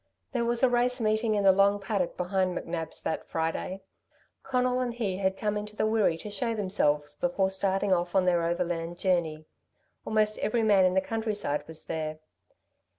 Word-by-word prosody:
There 240 -3 0
was 235 +1 +1
a - - +8
race 245 +1 +2
meeting 215 0 +1
in 205 - +1
the 195 - +7
long 200 +1 +3
paddock 195 -3 -2
behind 185 0 0
McNab's 165 -1 -4
that - - -3
Friday. 165 +4 -2 0.6
Conal 255 -1 0
and 245 -2 -2
he 200 -6 -2
had 190 0 0
come 210 -1 -1
into 210 0 -5
the - - +1
Wirree 215 -6 +2
to 210 - -6
show 230 +3 -1
themselves 150 -8 0
before 190 +3 0
starting 195 0 +1
off 175 0 -1
on 190 -1 +4
their 175 -1 +3
overland 170 0 -2
journey. 170 -4 0 0.6
Almost 215 -1 +1
every 225 +1 0
man 200 -3 +5
in 185 0 +2
the 190 - +4
countryside 205 -9 -2
was 160 -1 -7
there. 155 -1 -3
195 Hz, 180 wpm, -28 LUFS, 175-215 Hz, 0.6 s, a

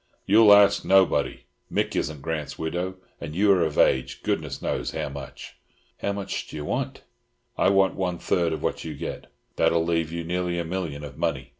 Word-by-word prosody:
"You'll 105 +1 +6
ask 100 -1 +6
nobody. 95 -1 +3 0.3
Mick - - 0
isn't 75 -2 -2
Grant's 80 -3 -4
widow, 90 +3 -3 0.2
and 75 +2 -7
you 100 +2 +4
are 95 -2 +4
of 80 -2 -2
age, 65 - +2
goodness - - -2
knows. - - -2
How - - -3
much?" 70 -1 -9 0.4
"How 100 - -1
much 100 -1 -4
d'ye 75 - -7
want?" 75 - -3 0.5
"I - - +3
want 95 -1 +3
one 90 -2 -2
third 85 -1 0
of 80 - -4
what - - -2
you - - -6
get. - - -7 0.3
That'll 85 -1 +3
leave 80 -2 0
you 85 0 -4
nearly 90 +1 -2
a 85 - -2
million 80 -5 -4
of 70 -3 -9
money. - - -2
85 Hz, 185 wpm, -25 LUFS, 80-95 Hz, 0.5 s, You'll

